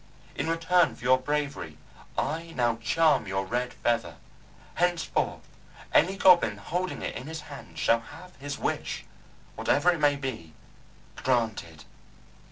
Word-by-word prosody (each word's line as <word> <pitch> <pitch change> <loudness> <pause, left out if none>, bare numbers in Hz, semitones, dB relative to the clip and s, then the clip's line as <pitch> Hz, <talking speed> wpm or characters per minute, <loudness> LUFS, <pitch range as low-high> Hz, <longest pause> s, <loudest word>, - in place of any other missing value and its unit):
In 150 +4 -2
return 165 +1 +3
for - - -15
your 130 +1 +5
bravery 140 - -3 0.4
I 165 +2 -2
now 120 -2 +1
charm 135 0 +2
your 95 0 -1
Red 125 +5 -1
Feather. 115 -1 -1 0.6
Henceforth 175 -1 0 0.5
any 190 +5 +4
goblin 175 - +5
holding 180 - -3
it - - -3
in 130 - -6
his 160 0 -5
hand 145 -3 -11
shall 115 - +3
have 180 +10 -13
his 145 +1 -5
wish - - -3 0.5
whatever 170 +5 +3
it 170 - -2
may 145 -1 +4
be 120 - -6 0.6
granted." 110 -11 -1
140 Hz, 135 wpm, -28 LUFS, 115-165 Hz, 0.6 s, your